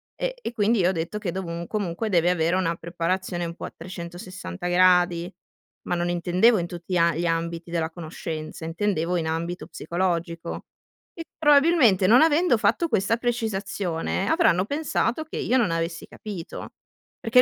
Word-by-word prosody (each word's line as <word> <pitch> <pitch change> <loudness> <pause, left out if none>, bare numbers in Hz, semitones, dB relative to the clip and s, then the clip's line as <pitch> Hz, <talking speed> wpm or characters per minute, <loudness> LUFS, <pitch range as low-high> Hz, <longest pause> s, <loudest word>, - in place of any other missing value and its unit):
e - - -2
e 245 - -5
quindi 225 +1 +2
io 180 0 +4
ho - - +2
detto 170 +5 -3
che 185 -5 -3
dovun 170 -2 -4
comunque 210 0 -2
deve 175 -2 +3
avere 170 0 +2
una 170 -2 0
preparazione 175 +1 -2
un 170 - -6
po' - - -7
a - - -8
360 180 +1 -7
gradi, 180 -1 +3 0.6
ma 175 - 0
non 175 0 -1
intendevo 180 +5 +3
in 170 - -2
tutti 175 +1 -7
gli - - +3
a 170 -1 +3
gli 175 - -1
ambiti 165 0 -2
della 165 -2 -1
conoscenza, 160 -1 -6
intendevo 175 0 -1
in 165 - -1
ambito 170 +2 -3
psicologico. 170 -1 -3 0.5
E 330 - -6
probabilmente, 290 - +5
non 245 +6 +7
avendo 320 -4 +4
fatto 335 - +2
questa 225 +1 +1
precisazione, 205 -6 -2
avranno 260 - +3
pensato 290 0 -1
che 315 - -7
io 255 - +1
non 210 -9 +2
avessi 165 0 -2
capito. 195 -6 -8 0.5
Perché 235 +2 +5
180 Hz, 165 wpm, -25 LUFS, 170-220 Hz, 0.6 s, non